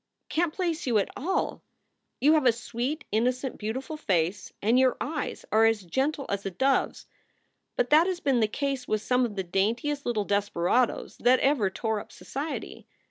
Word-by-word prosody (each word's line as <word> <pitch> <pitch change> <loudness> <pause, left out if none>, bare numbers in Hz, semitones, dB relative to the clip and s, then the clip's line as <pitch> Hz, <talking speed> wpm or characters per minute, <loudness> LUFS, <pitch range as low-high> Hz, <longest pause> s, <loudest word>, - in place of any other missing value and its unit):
"Can 340 +1 +1
t 310 - -19
place 340 -5 -2
you 235 -3 +3
at 200 - +1
all. 370 +7 -1 0.6
You 300 +3 +5
have 300 -5 +3
a - - +7
sweet, 240 +6 -4
innocent, 250 +4 0
beautiful 260 +8 -4
face 185 - -1
and 230 +5 +3
your 260 -2 +3
eyes 300 0 -4
are 220 +1 +5
as 225 -3 +2
gentle 270 - -1
as 200 0 -2
a 195 - -2
dove 265 +9 +2
s. - - -15 0.7
But - - 0
that 315 +4 +6
has 370 -2 -1
been 270 -6 +2
the 220 - +3
case 275 +2 -3
with 215 0 -1
some 250 0 +2
of 215 -4 -5
the 190 - -2
daintiest 230 +11 -1
little 215 -4 -1
desperadoes 205 +3 0
that 250 +2 +4
ever 265 -8 +2
tore 220 +2 -2
up - - -11
society. 290 +4 -6
250 Hz, 190 wpm, -27 LUFS, 210-290 Hz, 0.7 s, a